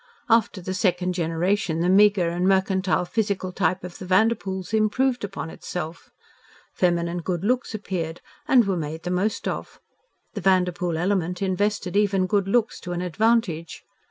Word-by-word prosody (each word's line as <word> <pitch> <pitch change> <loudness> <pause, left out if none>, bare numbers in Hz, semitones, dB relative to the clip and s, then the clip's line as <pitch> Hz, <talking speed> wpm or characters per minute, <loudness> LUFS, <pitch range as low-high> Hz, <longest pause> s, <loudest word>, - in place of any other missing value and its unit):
After 225 -4 +3
the 185 +1 -4
second 180 -2 +1
generation 170 +1 0
the 175 - +1
meagre 195 -1 +5
and 175 +2 0
mercantile 190 -1 +2
physical 200 -2 -1
type 180 0 0
of 180 -1 -8
the 185 - -7
Vanderpoels 190 -1 +1
improved 240 +4 +1
upon 195 -5 -5
itself. 170 -1 -6 0.6
Feminine 175 -1 0
good 175 0 -3
looks 245 +1 0
appeared 175 -5 -4 0.3
and 250 -6 +5
were 195 -1 0
made 160 0 -5
the 180 - -3
most 195 +4 -1
of. - - -5 0.5
The 205 - -5
Vanderpoel 180 -2 +1
element 180 0 0
invested 195 0 -1
even 200 -2 +2
good 200 0 +1
looks 230 +2 +1
to 175 - -5
an 175 - -3
advantage. 180 -3 0
185 Hz, 155 wpm, -24 LUFS, 175-205 Hz, 0.6 s, meagre